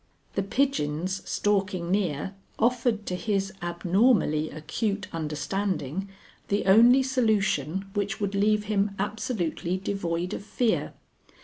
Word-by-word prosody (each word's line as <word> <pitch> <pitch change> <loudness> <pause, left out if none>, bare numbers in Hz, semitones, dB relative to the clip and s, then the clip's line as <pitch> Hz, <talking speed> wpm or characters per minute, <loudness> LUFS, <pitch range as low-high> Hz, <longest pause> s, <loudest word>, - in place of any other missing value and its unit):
"The 195 - 0
pigeons 190 - 0
stalking 195 -4 0
near 190 -3 0 0.2
offered 230 -2 +1
to 180 - -2
his 195 0 -1
abnormally 175 -2 +2
acute 200 +6 -2
understanding 160 +2 -2 0.4
the 200 +1 0
only 235 +7 +7
solution 200 - +1
which 205 0 -2
would 200 -1 -1
leave 210 +1 +2
him 205 -1 0
absolutely 200 - -2
devoid 180 -3 -2
of - - -5
fear. 225 +2 0
195 Hz, 110 wpm, -27 LUFS, 175-215 Hz, 0.4 s, only